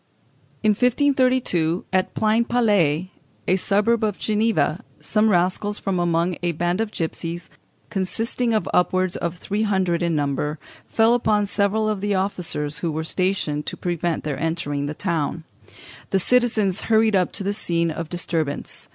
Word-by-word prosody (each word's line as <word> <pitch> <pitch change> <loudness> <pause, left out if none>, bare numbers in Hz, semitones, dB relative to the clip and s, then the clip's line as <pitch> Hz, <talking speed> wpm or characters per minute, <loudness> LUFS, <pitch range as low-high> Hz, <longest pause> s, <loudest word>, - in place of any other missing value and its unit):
In 215 - +5
1532, 250 - +2
at 185 0 +1
Pleinpalais, 215 -7 +2 0.4
a 185 - +4
suburb 210 +4 +1
of 210 -2 0
Geneva, 215 -5 0 0.2
some 215 0 +2
rascals 185 +3 +1
from 190 -3 -2
among 170 0 +1
a 175 -1 0
band 175 +5 0
of 220 -2 -2
gipsies, 165 0 -4 0.4
consisting 225 +5 -1
of 210 -5 0
upwards 185 0 +2
of 170 +1 -3
three 205 +5 -3
hundred 190 -5 +1
in 170 -2 +1
number, 145 +1 -1 0.3
fell 225 +1 +3
upon 215 -4 +2
several 200 +2 +1
of 210 -3 -1
the 205 0 0
officers 165 -6 -2
who 165 0 -1
were 160 +1 -3
stationed 160 -4 -1
to - - -4
prevent 175 -2 -2
their 145 -3 -3
entering 145 -4 -2
the 150 - -4
town. 165 -3 -2 0.7
The 195 - +2
citizens 220 -3 +2
hurried 220 -1 +4
up 185 -2 +2
to - - -2
the 200 +1 -1
scene 170 -5 0
of 160 0 -5
disturbance. 165 -4 -3
185 Hz, 150 wpm, -22 LUFS, 165-215 Hz, 0.7 s, In